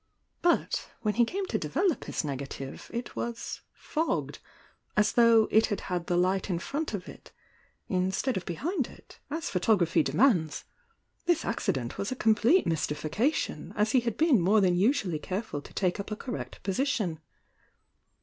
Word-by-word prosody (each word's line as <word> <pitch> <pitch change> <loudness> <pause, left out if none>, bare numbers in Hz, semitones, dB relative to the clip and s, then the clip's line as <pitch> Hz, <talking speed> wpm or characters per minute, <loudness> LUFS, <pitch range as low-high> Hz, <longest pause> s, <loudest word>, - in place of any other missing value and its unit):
But 345 0 +1
when 210 -1 +1
he 235 +1 +4
came 385 +10 -3
to - - -1
develop 370 -7 0
his - - -2
negative 135 -1 -6
it 235 +1 -5
was 235 -1 -4
fogged," 320 +2 -2 0.6
as 210 0 +4
though 230 -2 +5
it 220 +1 +5
had 205 - -2
had 175 -2 -3
the 175 - +1
light 185 +2 +1
in 180 - 0
front 285 - -3
of 185 - -7
It - - -12 0.6
mstead 190 +7 0
of 185 - -4
behmd 285 - -2
it, - - -16
as 320 +3 -3
photography 180 -2 +3
demands. 180 - +2 0.6
This 340 -2 +2
accident 130 - -2
was 200 - -2
a - - -1
complete 230 - +4
mystification, 165 - -1
as 210 +1 +2
he 255 - +5
had 235 -2 -3
been 305 - +4
more 200 +5 +4
than 185 -3 +3
usually 195 - +2
careful 185 -4 -4
to - - -13
take 185 0 0
up 200 - -5
a 215 - -2
cor 245 +3 -6
rect - - -7
position. 195 - 0
210 Hz, 165 wpm, -29 LUFS, 180-255 Hz, 0.6 s, though